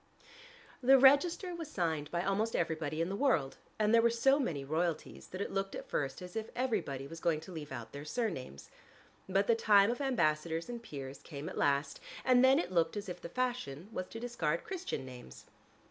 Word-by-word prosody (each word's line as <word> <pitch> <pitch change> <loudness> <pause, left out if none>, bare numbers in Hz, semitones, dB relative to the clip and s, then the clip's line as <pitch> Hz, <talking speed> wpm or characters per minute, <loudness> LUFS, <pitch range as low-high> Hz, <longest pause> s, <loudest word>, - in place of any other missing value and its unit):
The 270 +2 +7
register 310 +7 +5
was 330 -3 -6
signed 160 - -1
by 175 +1 -1
almost 210 +4 0
everybody 160 -1 -1
in 170 - 0
the 195 - -2
world, 200 - +1 0.2
and 215 +1 +2
there 230 - +7
were 235 - +4
so 270 +5 +3
many 155 - -2
royalties 160 +3 -2
that 185 - -6
it - - -3
looked 195 0 -2
at - - -7
first 135 +3 -2
as 180 0 -10
if 220 0 -3
everybody 220 - -1
was 165 +4 -8
going 160 -2 +1
to 190 - -10
leave 155 -4 -7
out 115 -4 -6
their 140 0 -7
surnames. 150 - -4 0.6
But 195 +2 +2
the 230 - +4
time 210 -1 +5
of 245 - -4
ambassadors 165 - 0
and 240 -1 -5
peers 135 -8 -7
came 145 -1 -8
at - - -8
last, 140 0 +1 0.3
and 255 -1 +5
then 265 +1 +7
it 180 - -1
looked 170 +1 +1
as 205 -1 -5
if 180 0 -6
the 170 - -7
fashion 210 - -3
was 185 -4 -4
to 225 - -8
discard 175 -10 -1
Christian 370 - -4
names. 125 - -11
180 Hz, 205 wpm, -33 LUFS, 150-235 Hz, 0.6 s, The